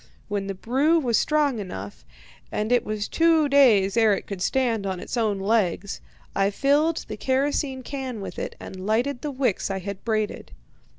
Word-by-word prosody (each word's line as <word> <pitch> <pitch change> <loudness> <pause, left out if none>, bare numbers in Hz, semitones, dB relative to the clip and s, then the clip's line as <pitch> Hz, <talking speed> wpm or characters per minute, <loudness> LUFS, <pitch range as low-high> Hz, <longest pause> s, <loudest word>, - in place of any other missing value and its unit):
When 200 -1 -2
the 195 - -3
brew 270 - +2
was 245 -8 +2
strong 295 -6 +1
enough 100 - -7 0.5
(and 215 +2 -2
it 245 -1 +4
was 210 -2 -3
two 325 -2 +3
days 235 -9 +5
ere 220 -3 +4
it - - -6
could 195 -3 -6
stand 230 -2 +1
on 190 -2 -3
its - - -5
own 220 -4 +1
legs), 195 -2 0 0.3
I 195 0 +3
filled 290 +8 +1
the 215 - -6
kerosene 265 +1 0
can 260 -4 -5
with 195 - -6
it, - - -5
and 185 +1 -8
lighted 245 +4 0
the 300 - -3
wicks 255 -9 -1
I 195 - -2
had 195 +1 -6
braided. 215 -2 -2
230 Hz, 180 wpm, -24 LUFS, 200-275 Hz, 0.5 s, days